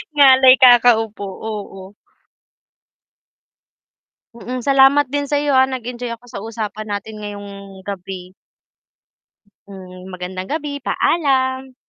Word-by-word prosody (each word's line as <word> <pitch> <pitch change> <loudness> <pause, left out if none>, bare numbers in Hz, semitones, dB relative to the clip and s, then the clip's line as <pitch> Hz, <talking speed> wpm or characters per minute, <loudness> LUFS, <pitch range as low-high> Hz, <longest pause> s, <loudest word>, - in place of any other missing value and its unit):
Ngalay 265 -2 +7
kakaupo, 235 -5 +4
oo. 195 -1 -8 2.4
Mm. 245 +1 -7
Salamat 275 +1 +5
din 285 -1 -2
sa'yo, 290 0 0
ah, 265 0 +4
nag-enjoy 245 -1 -6
ako 230 - -28
sa 240 - -9
usapan 215 -1 -6
natin 210 +1 -6
ngayong 205 -1 -8 0.4
gabi. 185 -2 -8 1.3
Hmm, 185 -1 -12
magandang 185 +1 -7
gabi, 290 -2 -4
paalam. 265 -5 0
235 Hz, 95 wpm, -18 LUFS, 200-265 Hz, 2.4 s, Ngalay